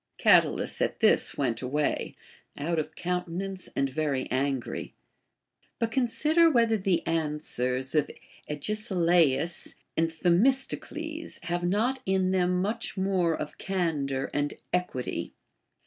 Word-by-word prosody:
Catulus - - +3
at - - 0
this - - +3
went 115 - 0
away, 145 +4 -1 0.4
out 165 +3 -1
of 155 0 -4
countenance 180 +2 -3
and 135 - +2
very 135 -1 -1
angry. 135 -1 -2 0.8
But 230 -1 -1
consider 300 +7 +3
whether 230 -6 +3
the 185 -4 0
answers 150 -5 -1
of 150 -2 +2 0.4
Agesilaus 170 - +1 0.2
and 165 0 +2
Themistocles 270 - 0
have 175 0 -2
not 225 +9 +1
in 190 -1 +2
them 180 -1 +2
much 215 +1 -3
more 185 -4 +1
of 150 - -6
candor 150 -8 -1
and 145 0 -1 0.2
equity. 180 -8 -2
175 Hz, 115 wpm, -28 LUFS, 150-195 Hz, 0.8 s, Catulus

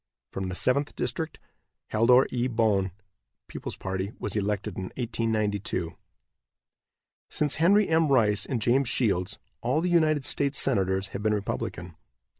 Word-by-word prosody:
From 95 -1 -4
the 90 - -4
Seventh 140 +7 0
district 160 -1 -3 0.5
Haldor 125 +4 +5
E. 125 0 0
Boen, 110 -5 +1 0.6
People's - - -6
Party, 95 +2 -4
was 105 - -4
elected 105 -1 -2
in 95 - -4
1892. 110 -7 -1 1.3
Since 150 -2 +1
Henry 200 +4 +5
M. 160 -1 +3
Rice 105 -7 +2
and 125 - -1
James 120 +3 +2
Shields, 105 -5 0 0.2
all 130 +6 +1
the 180 +2 0
United 155 -5 +3
States 140 -1 +1
Senators 95 -6 +2
have 100 - -6
been 105 0 +1
Republican. 85 -4 -4
110 Hz, 135 wpm, -27 LUFS, 100-135 Hz, 1.3 s, Haldor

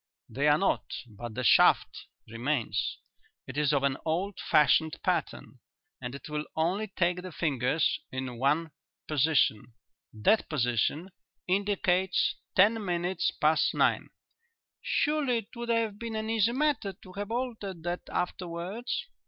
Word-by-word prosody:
"They 140 +3 0
are 150 0 +5
not, 195 - 0
but 115 0 -9
the 130 - -2
shaft 115 - +4 0.2
remains. 115 - -1 0.5
It 130 - -9
is 150 -1 +2
of 140 -2 +1
an 140 -1 +1
old 180 +5 -2
fashioned 150 +2 +3
pattern - - -2 0.4
and 125 +1 -5
it 140 - -9
will 150 0 -3
only 180 +7 0
take 180 -2 0
the 185 0 -8
fingers 150 0 0
in 130 -2 -5
one 150 +5 +1 0.4
position. 140 -7 +2 0.4
That 160 - +2
position 145 - 0 0.4
indicates 190 -1 +1 0.2
ten 215 +3 +4
minutes 180 0 0
past 155 +1 +2
nine." - - +2 0.7
"Surely 295 -5 +1
it 225 +2 -7
would 235 0 -6
have 225 -3 0
been 230 -1 -5
an 220 0 -2
easy 225 0 +3
matter 265 -7 0
to 185 0 -15
have 200 +1 -5
altered 225 -8 -4
that 175 +1 -2
afterwards?" 180 +6 -3
175 Hz, 135 wpm, -29 LUFS, 140-205 Hz, 0.7 s, are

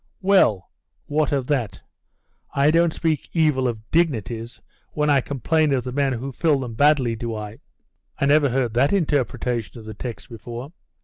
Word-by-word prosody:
'Well, 185 - +3 0.3
what 150 -1 0
of 135 -3 0
that? 120 -9 -2 0.7
I 140 +2 +4
don't 170 +1 +3
speak 160 -2 -2
evil 150 -6 +2
of 110 -2 -5
dignities, 120 - -1 0.3
when 150 0 +1
I 140 -2 +4
complain 150 +4 0
of 125 - -1
the 125 - -5
men 135 0 0
who 130 +3 -5
fill 150 +1 +1
them 120 -3 -5
badly, 135 -2 +3
do 115 0 -4
I?' 105 0 -7 0.6
'I - - +2
never 145 0 +4
heard 125 -2 0
that 135 +7 +2
interpretation 125 - -1
of 110 - -11
the 110 - -7
text 115 -5 -7
before. 120 +4 -8
130 Hz, 170 wpm, -22 LUFS, 115-150 Hz, 0.7 s, I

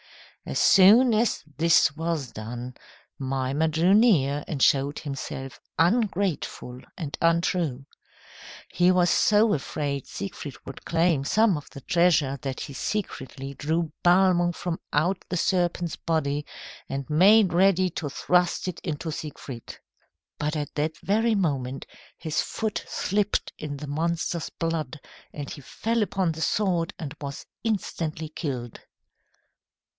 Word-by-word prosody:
As - - -3
soon 220 +6 +7
as 220 +2 +1 0.2
this 160 -3 +4
was 160 -5 -2
done, 120 +3 -6 0.5
Mimer 135 +3 0
drew 165 +4 +3
near 150 - +4
and 150 - -4
showed 140 +2 +3
himself 135 -2 -6 0.2
ungrateful 180 - 0 0.2
and 150 -5 -4
untrue. 165 -5 +1 0.8
He 175 +1 +2
was 180 -1 +3
so 215 +1 +4
afraid 140 -1 -3
Siegfried 175 -8 -6
would 135 - -9
claim 165 -4 +2
some 215 +6 +3
of 145 - -7
the 140 - -10
treasure 165 -6 +2
that 135 -2 -4
he 140 - -6
secretly 135 - -4
drew 160 +3 -1
Balmung 175 -1 +4
from 170 0 -4
out 175 +6 +1
the 180 - -1
serpent's 175 -1 0
body, 150 -3 -1 0.4
and 135 0 -4
made 190 +5 +5
ready 185 0 +4
to 155 -2 -4
thrust 180 +6 +1
it 180 - -4
into 160 -1 -3
Siegfried. 145 -6 -7 0.6
But 150 +1 -1
at 150 -2 -4
that 155 +2 -2
very 220 +3 +2
moment 135 -8 -1 0.3
his 155 -2 -1
foot 220 -2 -3
slipped 205 +1 -1
in 145 -2 -5
the 150 +1 -7
monster's 165 +2 -2
blood, 160 -4 -3 0.3
and 145 -2 -6
he 145 - -8
fell 230 - -2
upon 190 -3 0
the 160 0 -7
sword 180 -2 0
and 155 -5 -6
was 140 0 -6 0.2
instantly 165 -8 -2
killed. 130 -7 -5
165 Hz, 130 wpm, -26 LUFS, 140-185 Hz, 0.8 s, soon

